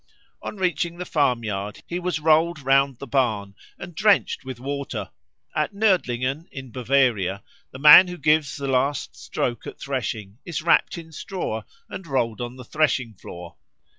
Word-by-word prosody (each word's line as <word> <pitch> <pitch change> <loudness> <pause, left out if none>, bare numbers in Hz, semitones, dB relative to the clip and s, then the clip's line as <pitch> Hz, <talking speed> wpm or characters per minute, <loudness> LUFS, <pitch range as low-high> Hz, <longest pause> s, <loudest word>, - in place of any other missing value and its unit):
On - - -6
reaching 175 -2 -1
the 180 - -5
farmyard 115 - -1
he 175 - -4
was 180 -2 -2
rolled 160 +2 +3
round 135 0 +3
the 140 - -8
barn 110 -8 0 0.2
and 175 0 -9
drenched 210 +3 +2
with 130 -2 -7
water. 135 -7 -4 0.4
At 155 +6 -1
Nördlingen 155 - +1
in 130 -2 -9
Bavaria 120 -7 +1 0.3
the - - -10
man 150 +6 +9
who 180 0 -6
gives 150 -5 +2
the 140 -1 -4
last 135 +1 0
stroke 120 -2 -3
at - - -9
threshing 115 -6 -4
is 165 -3 -4
wrapt 170 - +3
in 165 -1 -10
straw 160 - -4 0.3
and 185 - -8
rolled 120 -5 -1
on 120 +1 -5
the 130 - -10
threshing 135 -5 0
floor. 85 -3 -11
135 Hz, 160 wpm, -24 LUFS, 120-160 Hz, 0.4 s, man